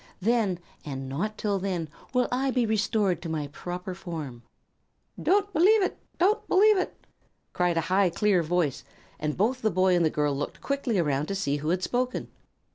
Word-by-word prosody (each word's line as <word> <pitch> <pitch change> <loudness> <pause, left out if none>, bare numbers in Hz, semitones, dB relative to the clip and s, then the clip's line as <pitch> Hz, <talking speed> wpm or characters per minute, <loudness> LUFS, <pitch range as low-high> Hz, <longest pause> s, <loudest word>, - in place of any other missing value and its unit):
Then, 210 -3 +1 0.3
and 135 -2 -5
not 195 +11 -3
till 200 -2 0
then, 180 -4 -2 0.2
will 250 -1 +2
I 265 +2 +1
be 250 -2 +1
restored 205 -4 +1
to 165 - -5
my 155 -2 -2
proper 180 +5 -6
form." 160 -10 -6 0.8
"Don't 405 +2 +2
believe 395 +6 +5
it! - - -2 0.2
Don't 395 +5 +2
believe 415 +1 +5
it!" - - -5 0.5
cried 175 -1 +1
a - - +3
high, 185 +3 +2
clear 185 +2 +2
voice, 165 -5 0 0.4
and 150 -1 -2
both 245 +7 +1
the 220 - +2
boy 185 -1 +3
and 175 - +3
the 160 - +3
girl 150 -2 0
looked 145 +1 -4
quickly 280 -6 -1
around 150 -3 +1
to 200 - -2
see 165 -7 0
who 150 +2 -3
had 180 +2 0
spoken. 250 +3 -1
185 Hz, 185 wpm, -27 LUFS, 160-240 Hz, 0.8 s, believe